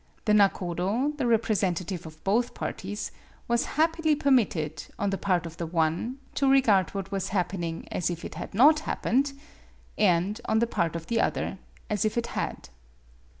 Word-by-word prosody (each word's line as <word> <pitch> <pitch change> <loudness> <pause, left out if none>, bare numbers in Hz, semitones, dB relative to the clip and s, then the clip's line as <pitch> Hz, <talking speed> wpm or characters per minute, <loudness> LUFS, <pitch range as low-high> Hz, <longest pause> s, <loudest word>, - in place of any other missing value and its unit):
The 210 - +3
nakodo, 200 - +2
the 265 -4 0
rep 230 -1 +3
resentative 180 -4 -1
of 155 0 -14
both 225 +5 +1
parties, 205 +3 -4 0.4
was 235 0 +2
happily 320 -1 +3
per 280 -1 +1
mitted, 165 - +1
on 200 -1 0
the 195 - -1
part 180 -3 +1
of 165 0 -8
the 170 - -3
one, 165 +9 0 0.2
to 275 -1 +2
regard 220 -9 +4
what 195 0 -4
was 195 -1 -2
happening 175 -2 -2
as 180 - 0
if 170 -1 -5
it - - -6
had - - -7
not 300 +7 +7
happened, 275 -2 0 0.7
and, 195 +3 +2
on 220 - +1
the 235 - +3
part 170 -8 -1
of 165 -1 -5
the 230 +3 +1
other, - - -1 0.3
as 210 -2 0
if 215 +1 0
it 235 - +1
had. - - -4
200 Hz, 180 wpm, -27 LUFS, 175-235 Hz, 0.7 s, not